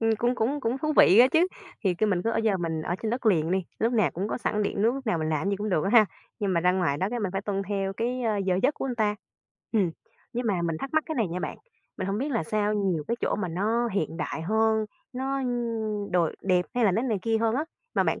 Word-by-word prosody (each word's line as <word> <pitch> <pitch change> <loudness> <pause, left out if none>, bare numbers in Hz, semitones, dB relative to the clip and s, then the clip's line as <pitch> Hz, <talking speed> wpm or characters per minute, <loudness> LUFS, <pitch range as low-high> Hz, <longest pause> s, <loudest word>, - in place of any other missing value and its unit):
Ừm, 225 0 +2
cũng 240 +2 +1
cũng 265 +5 0
cũng 240 +3 -1
thú 305 +2 0
vị 190 - +7
á 245 - +9
chứ, 335 +3 +4 0.4
thì 185 -2 +3
cứ 215 +5 +1
mình 185 -4 +1
cứ 230 - 0
ở - - -1
giờ 220 -3 +2
mình 165 -3 -2
ở 175 - -2
trên 220 - -1
đất 245 0 -2
liền 165 -6 +3
đi, 185 -1 +1
lúc 230 +2 +1
nào 215 -5 +3
cũng 195 +5 -3
có - - -2
sẵn 210 -3 0
điện 200 0 -1
nước, 230 +3 +3
lúc 270 -1 -7
nào 175 -6 +1
mình 155 0 -1
làm 155 -1 0
cái 200 - +1
gì 200 - 0
cũng 210 +2 -3
được 160 -6 +1
á 195 - 0
ha, 220 -3 +7 0.3
nhưng 200 -2 0
mà 170 - +2
ra 180 +1 +3
ngoài 175 -6 +1
đó 185 - 0
cái 245 - -2
mình 195 -4 -2
phải 195 - -1
tuân 195 -1 -2
theo 195 -1 -1
cái, 245 +4 -2
ơ, 220 -3 +1
giờ 185 -2 +1
giấc 280 +4 +3
của - - -4
người 260 -2 -2
ta. 215 -3 +1 0.6
Ừm, 200 -7 +2 0.4
nhưng 245 0 -2
mà 190 -5 +1
mình 165 -2 -1
thắc 275 - -5
mắc 315 - +3
cái 315 - -3
này 225 - 0
nha 180 +2 -4
bạn, - - -4 0.4
mình - - -3
hông 195 +1 -1
biết 275 +5 -1
là 230 -10 0
sao 210 +4 0
nhiều 185 -7 0
cái 235 - 0
chỗ - - 0
mà 195 -3 -2
nó 220 +8 0
hiện 175 -6 -2
đại 160 0 -3
hơn, 220 +3 +2 0.3
nó 270 +2 -2
nh 225 -4 -2
đồi 175 -3 +1
đẹp 180 -2 +2
hay 245 -1 +2
là 200 - +4
nó 220 +6 +1
này 230 -6 0
kia 225 -1 +1
hơn 225 0 +1
á, 290 +4 0 0.3
mà - - +4
bạn - - 0
210 Hz, 295 wpm, -27 LUFS, 185-235 Hz, 0.6 s, á